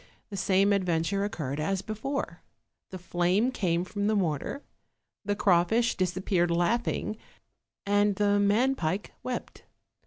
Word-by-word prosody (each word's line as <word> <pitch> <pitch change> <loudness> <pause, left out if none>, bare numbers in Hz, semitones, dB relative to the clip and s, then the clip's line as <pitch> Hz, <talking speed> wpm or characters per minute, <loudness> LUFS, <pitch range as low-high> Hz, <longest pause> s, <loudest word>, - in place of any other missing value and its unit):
The - - -5
same 195 +1 +3
adventure 180 0 0
occurred 150 -8 -3
as 190 +5 -1
before: 225 +6 -4 0.5
the 185 - -7
flame 180 +6 +1
came 175 -8 0
from 205 +3 -2
the 215 - +2
mortar, 180 - -1 0.6
the 205 0 -1
crawfish 205 +6 +3
disappeared 185 -1 0
laughing, 210 +5 0 0.7
and 205 0 +2
the 205 0 +2
man 215 +7 +3
pike 185 -3 -2
wept. 250 -1 -5
200 Hz, 125 wpm, -28 LUFS, 175-210 Hz, 0.7 s, same